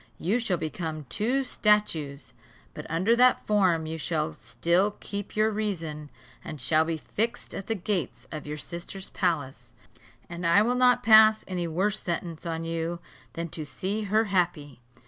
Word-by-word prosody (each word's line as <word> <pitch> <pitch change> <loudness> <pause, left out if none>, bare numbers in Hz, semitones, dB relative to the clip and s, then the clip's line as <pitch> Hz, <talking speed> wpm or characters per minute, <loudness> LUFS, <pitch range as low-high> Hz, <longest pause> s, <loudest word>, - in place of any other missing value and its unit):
You 205 +8 0
shall 205 -7 0
become 160 -1 -4
two 245 - 0
statues; 210 - 0 0.4
but 150 - -8
under 185 +9 +2
that 250 +1 +4
form 185 -6 +2
you 160 +1 -5
shall 155 -1 -1
still 185 +5 0
keep 200 0 -6
your 215 +1 +3
reason, 165 -9 -3 0.3
and 150 - -7
shall 155 +5 +3
be 165 0 -2
fixed 230 +9 -3
at 195 - -6
the 225 - 0
gates 185 - -3
of 155 -2 -6
your 150 0 -4
sister's 175 +4 -6
palace; 145 - -1 0.6
and 170 +1 -7
I 170 +5 +5
will 240 +3 +1
not 250 -1 +4
pass 220 -1 +7
any 180 -2 -2
worse 195 +6 -1
sentence 170 -1 -4
on 165 0 -3
you 165 +1 -2 0.4
than 170 0 -4
to 155 - -5
see 195 +9 -3
her 215 +3 +3
happy. 175 - -1
175 Hz, 165 wpm, -27 LUFS, 160-210 Hz, 0.6 s, pass